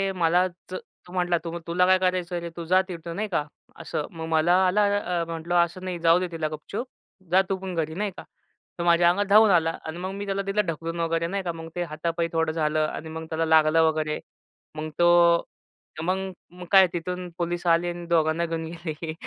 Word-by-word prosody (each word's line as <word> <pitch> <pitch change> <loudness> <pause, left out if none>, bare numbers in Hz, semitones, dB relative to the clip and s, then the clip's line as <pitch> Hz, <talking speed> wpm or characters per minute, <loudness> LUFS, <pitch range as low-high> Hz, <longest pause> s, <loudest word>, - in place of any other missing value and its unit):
मलाच 180 +1 +2 0.2
तर 185 - -4 0.3
तो 180 - -13
म्हटला, 175 -1 +1
"तो 165 0 -6
मग 170 0 -6
तुला 180 +2 +3
काय 185 0 +5
करायचं 180 -1 0
रे? 170 - -5
तू 170 - -5
जा 185 0 +5
तिथं," 170 -2 -7
नाही 215 +3 -2
का 150 -5 0 0.4
असं. 150 - -3
मग 160 -1 -6
मला 160 +2 +3
आला 205 +3 +3 0.4
अ, - - 0
म्हटलं, 165 +1 -4
"असं 170 +1 +1
नाही, 180 -2 -4
जाऊ 165 +1 +5
दे 185 - -2
तिला, 160 -2 -2
गपचूप. 175 - -5 0.4
जा 190 +2 +6
तू 195 - 0
पण 185 -1 -5
घरी," 160 -1 -2
नाही 205 +2 -2
का. - - -8 0.6
तर - - -1
माझ्या 170 0 +5
अंगात 200 +4 +1
धावून 210 +1 +6
आला 165 -2 +3 0.2
आणि 160 +2 -5
मग 185 +1 -4
मी 200 +1 -5
त्याला 195 0 -1
दिला 195 +2 0
ढकलून 165 -2 -4
वगैरे 165 0 0
नाही 195 +2 -3
का. 175 - -2
मग 165 0 -8
ते 175 - -1
हाता-पायी 165 +1 -2
थोडं 160 -1 +1
झालं 155 -1 0
आणि 160 +1 -6
मग 160 0 -6
त्याला 165 0 0
लागलं 160 0 +5
वगैरे. 155 -1 -2 0.6
मग 155 0 -4
तो 175 0 +5 0.6
मग 185 +3 +1 0.3
मग 180 0 -10
काय, 190 -1 +8
तिथून 180 +1 -4
पोलीस 175 0 -2
आले 170 +1 +3
आणि 175 0 -6
दोघांना 165 0 +2
घेऊन 165 -1 -3
गेले. 160 -1 -6
170 Hz, 215 wpm, -25 LUFS, 165-180 Hz, 0.6 s, काय